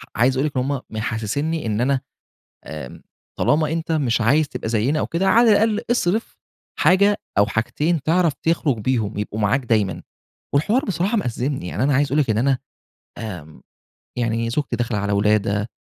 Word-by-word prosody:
عايز 130 +3 +2
أقول 140 - +1
لِك 140 -3 -5
إن 125 - +2
هم 140 -1 -2
محسّسني 115 +8 -2
إن 110 +1 -1
أنا 135 +1 +1 0.6
آمم 75 -3 -8 0.4
طالما 155 +1 +2
أنت 165 0 -2
مش 125 -7 +1
عايز 140 +6 +3
تبقى - - -5
زينا 120 +7 +1
أو - - -1
كده، 180 +4 -1
على 230 +3 +5
الأقل 215 +1 +3
أصرف 220 -2 0 0.4
حاجة 200 +2 +4 0.2
أو 100 - +5
حاجتين 150 +8 -1
تعرف 165 0 +2
تخرج 160 -7 +1
بيهم 110 -3 -1
يبقوا 105 +1 -3
معاك 120 +6 +1
دايمًا، 100 -7 0 0.5
والحوار 210 - +2
بصراحة 195 +4 0
مأزّمني، 125 - -2
يعني 105 +9 -3
أنا 140 -1 +2
عايز 145 +2 +3
أقول 150 +3 +2
لِك 130 - 0
إن 110 - +1
أنا 130 +1 +2 0.6
آمم، 85 -9 -8 0.6
يعني 115 -1 0
زوجتي 145 +4 -1
داخلة 120 -2 -2
على 100 0 -1
ولادة، 105 +1 +1
130 Hz, 170 wpm, -21 LUFS, 110-160 Hz, 0.6 s, على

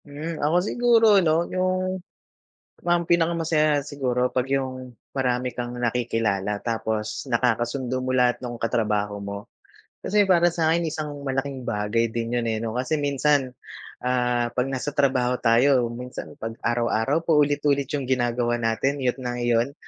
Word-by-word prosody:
Hmm, 155 +3 -6
ako 155 +4 +2
siguro 235 -1 +4
ano, 165 0 +2
yung 185 0 -1 0.9
mam 175 0 +3
pinaka 170 0 +2
masaya 155 -3 +2
siguro 130 -3 -1
pag 125 0 -1
yung, 130 -2 -3 0.2
marami 125 -1 -1
kang 120 0 -5
nakikilala 115 -4 -1
tapos, 110 0 -3
nakakasundo 125 +1 0
mo 130 - -1
lahat 125 -1 +3
nung 120 -1 -4
katrabaho 105 -3 0
mo. 100 0 -7 0.5
Kasi 210 +1 +2
para 175 -1 +5
sa'kin, 165 0 +1
isang 155 -1 -4 0.2
malaking 135 -1 -3
bagay 105 +3 0
din 115 +1 -2
yun 120 - -2
eh, 110 -1 -1
'no? 115 +1 -3
Kasi 130 +5 0
minsan, 140 -1 +2 0.5
ah, 125 -1 +1
'pag 125 +1 0
nasa 135 +2 -3
trabaho 130 -3 +2
tayo, 120 +1 +4
minsan 125 +1 -7
'pag 115 0 -4
araw-araw, 120 +6 0
paulit-ulit 145 -3 +2
yung 140 - -4
ginagawa 120 -2 +1
natin, 135 +5 0
iyu't 125 0 0
na 125 -1 -3
iyon. 120 +3 +1
125 Hz, 145 wpm, -24 LUFS, 120-145 Hz, 0.9 s, para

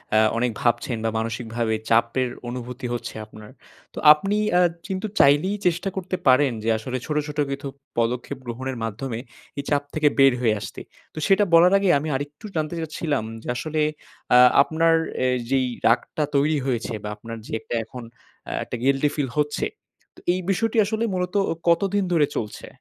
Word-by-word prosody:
আ - - +6 0.2
অনেক 120 0 +1
ভাবছেন 120 0 0
বা - - +2
মানসিকভাবে 115 0 -2
চাপের 120 +2 +2 0.2
অনুভূতি 125 +1 -6
হচ্ছে 120 - -5
আপনার। 105 0 -13 0.4
তো - - -6
আপনি 195 +7 -2 0.2
আ - - +5 0.3
কিন্তু 190 +2 -3
চাইলেই 145 +9 +4
চেষ্টা 175 +3 0
করতে 185 0 -3
পারেন 130 +1 +5
যে 115 - 0
আসলে 130 +3 -4
ছোট 150 - -3
ছোট 150 0 -7
কিছু 140 +1 -4 0.3
পদক্ষেপ 125 +3 -1
গ্রহণের 130 +2 -4
মাধ্যমে 115 +2 -4 0.4
এই - - -2
চাপ 145 -1 +2
থেকে 155 -1 +2
বের 135 -2 +7
হয়ে 110 -3 +3
আসতে। 100 - -7 0.3
তো - - -19
সেটা 195 +1 +5
বলার 175 +3 +7
আগে 195 -1 +1
আমি 155 - -5
আরেকটু 145 +8 -6
জানতে 155 +1 -1
চাচ্ছিলাম 150 -5 -2 0.2
যে - - -10
আসলে 155 +4 -2 0.5
আ - - +9 0.2
আপনার 165 +3 +3 0.3
এ - - +3 0.2
যেই 130 -1 +2 0.2
রাগটা 135 +6 +1
তৈরি 150 +2 +3
হয়েছে 120 -2 -1
বা 105 - -4
আপনার 115 +2 -8
যে - - -3 0.3
এখন 120 +2 -9 0.5
এ - - -4
১ - - -15
টা - - -1
গিল্টি 140 +2 +3
ফিল 140 -4 -1
হচ্ছে, 150 0 0 0.5
তো - - -15
এই 185 - -1
বিষয়টি 225 +4 0
আসলে 220 +2 -1
মূলত 180 0 -2 0.2
ও - - +1 0.2
কতদিন 195 +4 +2
ধরে 150 -3 +4
চলছে? 105 -2 -5
140 Hz, 175 wpm, -23 LUFS, 120-165 Hz, 0.5 s, আ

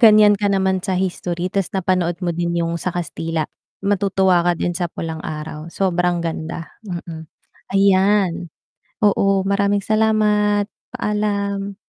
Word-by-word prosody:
ganiyan 215 -3 +8
ka 205 0 +1
naman 190 -1 +1
sa 190 -1 -1
history 180 0 -2
ta's 195 -4 0
napanood 180 -2 +1
mo 175 - 0
din 170 +1 -1
yung 170 0 -1
sa - - -1
Kastila, 165 -2 -2 0.4
matutuwa 190 -2 +3
ka 175 0 +1
din 175 - -1
sa 175 0 -2
Pulang 160 -1 -5
Araw. 155 +1 -6
Sobrang 175 -1 0
ganda, 165 0 -4 0.2
mm. 170 -6 -7 0.5
Ayan, 195 -2 +3 0.6
oo 195 -1 +3
maraming 200 +1 +1
salamat, 210 -1 +2 0.3
paalam. 200 -1 -1
190 Hz, 130 wpm, -20 LUFS, 170-200 Hz, 0.6 s, ganiyan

